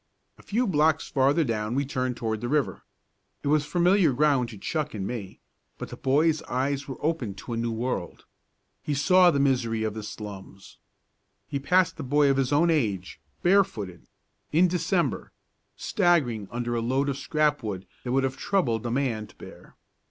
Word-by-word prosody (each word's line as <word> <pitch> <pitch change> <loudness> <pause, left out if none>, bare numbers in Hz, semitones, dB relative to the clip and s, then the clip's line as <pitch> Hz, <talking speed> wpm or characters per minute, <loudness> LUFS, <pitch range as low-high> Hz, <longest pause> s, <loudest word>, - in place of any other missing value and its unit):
A - - -13
few 235 +5 0
blocks 160 -4 +2
farther 140 +4 +3
down 110 -2 -2
we 140 +1 +1
turned 130 -3 -2
toward 110 -2 -2
the 120 - -3
river. 150 0 0 0.6
It 140 - -1
was 150 0 +2
familiar 175 -2 +3
ground 135 -3 +2
to 110 - -10
Chuck 150 +6 -3
and 95 -2 -3
me 105 -4 -6 0.4
but - - -7
the - - -7
boy's 150 +4 +2
eyes 135 +2 -1
were 135 - -6
opened 130 -12 -1
to 120 +5 -6
a - - -2
new 115 0 -1
world. 115 -6 -4 0.6
He 150 - -2
saw 180 +5 +5
the 145 -5 +1
misery 125 -5 +1
of 110 -1 -1
the 110 - -6
slums. 100 -2 -9 0.7
He 140 - -3
passed 180 +4 +2
a - - -3
boy 145 +1 +3
of 135 - 0
his 135 -1 0
own 165 +4 +4
age, 105 - -1 0.2
barefooted 175 - +1 0.4
in 170 +4 +5
December 175 0 -1 0.4
staggering 145 - +1
under 120 0 -3
a 115 - 0
load 130 +4 0
of 140 - -1
scrap 150 0 +1
wood 100 -5 -5 0.2
that 125 - -3
would 135 +1 +2
have 130 0 -2
troubled 120 - 0
a - - -2
man 120 -4 -1
to - - -20
bear. - - -13
135 Hz, 180 wpm, -26 LUFS, 115-155 Hz, 0.7 s, saw